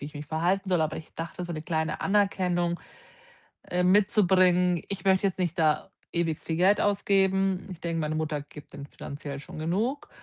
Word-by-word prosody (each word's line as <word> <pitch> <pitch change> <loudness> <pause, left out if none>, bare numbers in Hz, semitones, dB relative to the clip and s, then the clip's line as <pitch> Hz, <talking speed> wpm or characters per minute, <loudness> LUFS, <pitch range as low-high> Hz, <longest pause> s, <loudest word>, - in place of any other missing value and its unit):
wie 140 - -6
ich 150 - -11
mich 145 +1 -6
verhalten 180 +6 0
soll, 180 -3 +3
aber 155 0 0
ich 160 - -10
dachte, 165 +2 -5
so 175 - -5
'ne 155 - -4
kleine 160 -1 -2
Anerkennung, 180 -4 +1 0.9
äh, 180 0 +1
mitzubringen. 185 -3 +4
Ich 200 -1 -5
möchte 190 0 +3
jetzt 190 - -7
nicht 175 -2 -1
da 155 +3 +2 0.2
ewig 165 -2 0
viel 160 - -3
Geld 190 +4 +4
ausgeben. 195 -2 +2
Ich 170 - -11
denke, 165 -1 -2
meine 155 0 -1
Mutter 155 -2 -2
gibt 145 0 -14
dem 140 - -8
finanziell 140 -1 -7
schon 150 - -10
genug, 220 - -1
175 Hz, 190 wpm, -27 LUFS, 160-190 Hz, 0.9 s, mitzubringen